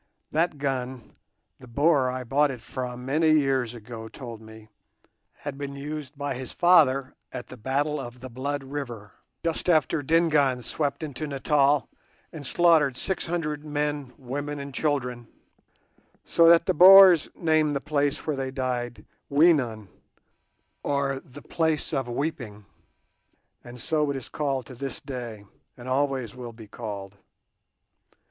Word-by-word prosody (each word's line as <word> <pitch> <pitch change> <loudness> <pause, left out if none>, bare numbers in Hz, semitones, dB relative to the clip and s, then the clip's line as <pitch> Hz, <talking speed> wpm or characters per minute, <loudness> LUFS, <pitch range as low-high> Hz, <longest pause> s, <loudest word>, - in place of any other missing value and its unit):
That 160 0 +1
gun, 130 -3 -4 0.5
the 125 - -13
Boer 140 +1 +3
I 130 0 -4
bought 145 +5 +2
it 130 -3 -5
from 125 +1 -6
many 155 +4 +3
years 135 -5 +1
ago 115 0 -8
told 115 -1 -9
me, 110 0 -13 0.6
had 145 -1 -8
been 140 -1 -5
used 145 0 -6
by 145 -1 -2
his 130 0 -6
father 140 -7 +4 0.2
at 120 - -7
the - - -9
battle 140 +5 -1
of 120 +1 -8
the 130 - -8
Blood 135 +3 -4
River, 125 -7 -6 0.3
just 165 +2 -1
after 155 -2 +3
Dingaan 145 -4 +2
swept 145 +3 -2
into 155 0 -5
Natal 140 0 +2 0.5
and 150 -4 -7
slaughtered 160 -7 +3
six 190 -3 -3
hundred 155 -3 -2
men, 145 -3 -2
women, 145 +3 -5
and 140 -1 -7
children, 125 -5 -2 1.0
so 165 0 +5
that 170 0 +6
the - - +2
Boers 185 -1 +9
named 155 -3 +2
the - - 0
place 145 -1 -1
where 155 - -1
they 135 -1 -3
died 125 -2 -3 0.2
"Weenen", 140 - +3 0.9
or 140 -1 -1
the 135 +3 -13
"Place 160 -3 -1
of 135 -2 -1
Weeping"; 120 -6 -4 1.0
and 120 0 -11
so 150 +3 0
it 140 - -1
is 130 - -8
called 135 -4 -2
to 130 - -11
this 135 +1 -5
day, 120 -6 -7 0.3
and 120 0 -10
always 130 -4 0
will 125 -2 -8
be 110 -1 -12
called. 100 -3 -7
140 Hz, 145 wpm, -26 LUFS, 125-150 Hz, 1.0 s, Boers